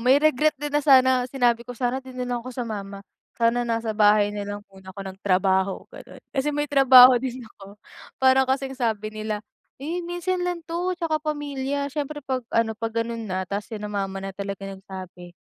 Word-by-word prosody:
may 255 Hz, +3 st, +5 dB
regret 310 Hz, 0 st, +3 dB
din 295 Hz, +1 st, -5 dB
na 295 Hz, -, +3 dB
sana 260 Hz, -3 st, +5 dB
sinabi 240 Hz, -3 st, +1 dB
ko, 245 Hz, -, -7 dB
"Sana 245 Hz, +2 st, -1 dB
'di 260 Hz, -1 st, -11 dB
nalang 245 Hz, -1 st, -3 dB
ako 255 Hz, -, -7 dB
sumama, 200 Hz, -3 st, -6 dB, 0.3 s
sana 235 Hz, +1 st, +1 dB
nasa 230 Hz, -1 st, -1 dB
bahay 210 Hz, -1 st, +4 dB
nalang 205 Hz, 0 st, -5 dB
muna 190 Hz, -1 st, -13 dB
ako 200 Hz, -, -6 dB
nagtrabaho." 190 Hz, 0 st, +1 dB
Ganon. -, -, -13 dB
Kasi 270 Hz, +1 st, -1 dB
may 295 Hz, 0 st, -2 dB
trabaho 255 Hz, -3 st, +8 dB
din 255 Hz, 0 st, -5 dB
ako, 200 Hz, -2 st, -14 dB, 0.5 s
parang 265 Hz, 0 st, +5 dB
kasing 265 Hz, 0 st, -2 dB
sabi 215 Hz, -3 st, -1 dB
nila, 215 Hz, -1 st, -4 dB, 0.4 s
"Eh, 330 Hz, +5 st, -3 dB
minsan 350 Hz, +1 st, -2 dB
lang 350 Hz, -2 st, -3 dB
to 345 Hz, +3 st, -2 dB
'tsaka 330 Hz, -3 st, -1 dB
pamilya." 285 Hz, -2 st, -3 dB
Syempre 295 Hz, 0 st, -4 dB
'pag 255 Hz, -3 st, -3 dB
ano, 220 Hz, -1 st, +1 dB
'pag 225 Hz, 0 st, -4 dB
ganun 230 Hz, -1 st, -5 dB
na, 185 Hz, -1 st, -2 dB
tapos 205 Hz, +1 st, -3 dB
sina 210 Hz, -2 st, -6 dB
mama 195 Hz, -1 st, -3 dB
na 195 Hz, -, -4 dB
talaga 195 Hz, 0 st, -6 dB
nagsabi, 185 Hz, -2 st, -10 dB
240 Hz, 180 wpm, -24 LUFS, 205-270 Hz, 0.5 s, trabaho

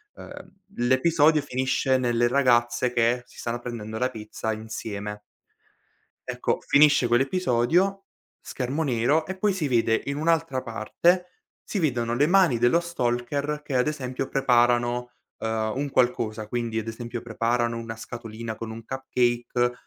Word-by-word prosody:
ehm, 285 Hz, -7 st, -11 dB, 0.2 s
l'episodio 150 Hz, +5 st, +3 dB
finisce 130 Hz, 0 st, 0 dB
nelle 120 Hz, -1 st, +2 dB
ragazze 120 Hz, -2 st, +2 dB
che 120 Hz, +1 st, +2 dB
si -, -, -17 dB
stanno 120 Hz, 0 st, -3 dB
prendendo 110 Hz, -3 st, -6 dB
la 125 Hz, +3 st, +1 dB
pizza 110 Hz, 0 st, -4 dB
insieme. 105 Hz, -1 st, -6 dB, 1.0 s
Ecco, -, -, -1 dB
finisce 145 Hz, -3 st, +5 dB
quell'episodio, 165 Hz, +8 st, +2 dB, 0.4 s
schermo 135 Hz, +5 st, -3 dB
nero, 135 Hz, +5 st, +1 dB
e 190 Hz, -, -5 dB
poi 200 Hz, +1 st, +1 dB
si 160 Hz, -6 st, -2 dB
vede 115 Hz, -2 st, +2 dB
in 140 Hz, 0 st, -2 dB
un'altra 155 Hz, -4 st, 0 dB
parte, 170 Hz, +11 st, +1 dB, 0.4 s
si 205 Hz, -, -3 dB
vedono 120 Hz, -7 st, 0 dB
le 145 Hz, +5 st, +3 dB
mani 175 Hz, -8 st, +4 dB
dello 120 Hz, +8 st, +4 dB
stalker 145 Hz, -1 st, -2 dB
che 140 Hz, -, -5 dB
ad 125 Hz, +4 st, +2 dB
esempio 135 Hz, -3 st, -3 dB
preparano, 120 Hz, -1 st, +2 dB, 0.3 s
ehm, 110 Hz, -1 st, -1 dB
un 145 Hz, +1 st, -1 dB
qualcosa, 115 Hz, -4 st, 0 dB
quindi 115 Hz, 0 st, -2 dB
ad 115 Hz, 0 st, -4 dB
esempio 120 Hz, +1 st, -6 dB
preparano 120 Hz, 0 st, -1 dB
una 115 Hz, -1 st, -6 dB
scatolina 115 Hz, -1 st, -7 dB
con 110 Hz, 0 st, -7 dB
un 115 Hz, 0 st, -8 dB
cupcake 120 Hz, -2 st, 0 dB
120 Hz, 140 wpm, -25 LUFS, 115-145 Hz, 1.0 s, finisce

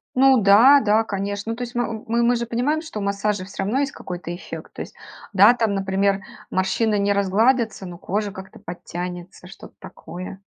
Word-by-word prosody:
Ну 265 Hz, -2 st, +5 dB
да, 235 Hz, +9 st, +7 dB
да, 215 Hz, +1 st, +3 dB
конечно. 200 Hz, +2 st, -3 dB
Ну, 230 Hz, -, -3 dB
то 245 Hz, -, -5 dB
есть, 240 Hz, 0 st, -8 dB
м 225 Hz, -2 st, -2 dB
мы 235 Hz, +1 st, +1 dB
мы 245 Hz, +1 st, +3 dB
же 235 Hz, -, -2 dB
понимаем, 250 Hz, +7 st, 0 dB
что 310 Hz, -10 st, -7 dB
у -, -, -4 dB
массажа 200 Hz, 0 st, -1 dB
всё 195 Hz, 0 st, -5 dB
равно 220 Hz, +8 st, 0 dB
есть 280 Hz, -1 st, -1 dB
какой-то 175 Hz, -1 st, -6 dB
эффект. -, -, -9 dB
То -, -, -7 dB
есть, -, -, -8 dB, 0.4 s
да, 205 Hz, +4 st, +7 dB
там, 225 Hz, -4 st, 0 dB
например, 195 Hz, 0 st, 0 dB, 0.3 s
морщины 205 Hz, +3 st, +1 dB
не 200 Hz, 0 st, +2 dB
разгладятся, 215 Hz, +2 st, +1 dB
но 175 Hz, -1 st, -8 dB
кожа 205 Hz, +2 st, -2 dB
как-то 190 Hz, 0 st, -11 dB
подтянется, 180 Hz, -1 st, -7 dB
что-то -, -, -13 dB
такое. 185 Hz, +2 st, -9 dB
205 Hz, 195 wpm, -22 LUFS, 190-235 Hz, 0.4 s, да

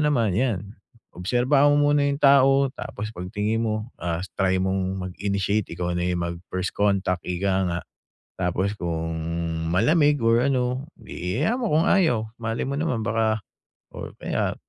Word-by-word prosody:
naman, 115 Hz, -9 st, +2 dB
‘yan, 105 Hz, -3 st, -1 dB, 0.4 s
obserbahan 125 Hz, +10 st, +3 dB
mo 145 Hz, 0 st, +4 dB
muna 145 Hz, -, +3 dB
yung 140 Hz, -, -1 dB
tao 135 Hz, 0 st, +6 dB
tapos 105 Hz, +2 st, -6 dB
pagtingin 105 Hz, +5 st, -2 dB
mo, 110 Hz, 0 st, -1 dB
ah, 85 Hz, 0 st, -2 dB, 0.2 s
try 95 Hz, -1 st, +3 dB
mong 95 Hz, 0 st, -1 dB
mag-initiate, 100 Hz, +2 st, -1 dB
ikaw 90 Hz, +1 st, -3 dB
na 90 Hz, -, -1 dB
yung 90 Hz, -1 st, -1 dB
mag 85 Hz, 0 st, -3 dB
first 95 Hz, 0 st, -3 dB
contact, 100 Hz, -3 st, +1 dB
ika 95 Hz, +2 st, 0 dB
nga. 85 Hz, 0 st, -2 dB, 0.6 s
Tapos 95 Hz, +3 st, 0 dB
kung 80 Hz, -3 st, -3 dB, 0.6 s
malamig 145 Hz, -, +3 dB
or 115 Hz, +1 st, +3 dB
ano, 130 Hz, 0 st, 0 dB
‘di 90 Hz, +5 st, -5 dB
hayaan 225 Hz, -, +1 dB
mo 225 Hz, -, 0 dB
kung 155 Hz, +2 st, +3 dB
ayaw. 140 Hz, -, +3 dB
Malay 115 Hz, 0 st, -2 dB
mo 140 Hz, -, -2 dB
naman 145 Hz, -6 st, -1 dB
baka 110 Hz, 0 st, +1 dB, 0.5 s
or -, -, -8 dB
kaya, -, -, -1 dB
105 Hz, 155 wpm, -24 LUFS, 95-135 Hz, 0.6 s, tao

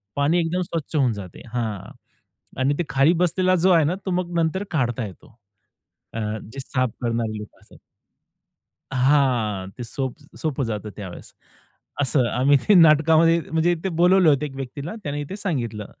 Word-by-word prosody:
पाणी 145 Hz, +5 st, +2 dB
एकदम 170 Hz, +2 st, 0 dB
स्वच्छ 165 Hz, -4 st, -4 dB
होऊन 135 Hz, -5 st, +3 dB
जाते. 100 Hz, -4 st, -9 dB
हां. 110 Hz, -6 st, -3 dB, 0.7 s
आणि 135 Hz, +2 st, +2 dB
ते 175 Hz, -, 0 dB
खाली 135 Hz, +5 st, +4 dB
बसलेला 185 Hz, +2 st, +2 dB
जो 185 Hz, +2 st, +3 dB
आहे 165 Hz, -3 st, +5 dB
ना, 165 Hz, +5 st, 0 dB
तो 190 Hz, -, -2 dB
मग 175 Hz, -1 st, -2 dB
नंतर 165 Hz, +4 st, 0 dB
काढता 120 Hz, -6 st, -1 dB
येतो. 105 Hz, +3 st, -13 dB, 0.8 s
अ, 115 Hz, -, -4 dB, 0.3 s
जे 135 Hz, -, -7 dB
साफ 130 Hz, -1 st, -1 dB
करणारे 115 Hz, -2 st, -1 dB
लोकं 105 Hz, 0 st, -10 dB
असतात. -, -, -19 dB, 1.2 s
हां. 125 Hz, -8 st, +1 dB
ते -, -, -5 dB
सोप, 130 Hz, +2 st, -4 dB, 0.2 s
सोपं 145 Hz, -4 st, -2 dB
जातं 105 Hz, -2 st, -4 dB
त्यावेळेस. 95 Hz, -4 st, -9 dB, 0.7 s
असं 130 Hz, -3 st, +2 dB
आम्ही 135 Hz, +4 st, +3 dB
ते 210 Hz, -, +7 dB
नाटकामध्ये 165 Hz, 0 st, +5 dB
म्हणजे 160 Hz, +2 st, +2 dB
इथे 175 Hz, +3 st, -3 dB
बोलवलं 180 Hz, +1 st, +4 dB
होतं 145 Hz, -1 st, +3 dB
एक 135 Hz, -, -10 dB
व्यक्तीला, 140 Hz, -, -6 dB
त्याने 145 Hz, -1 st, -3 dB
ही 145 Hz, -, -3 dB
ते 195 Hz, -, -4 dB
सांगितलं 120 Hz, -, -3 dB
145 Hz, 165 wpm, -23 LUFS, 120-165 Hz, 1.2 s, ते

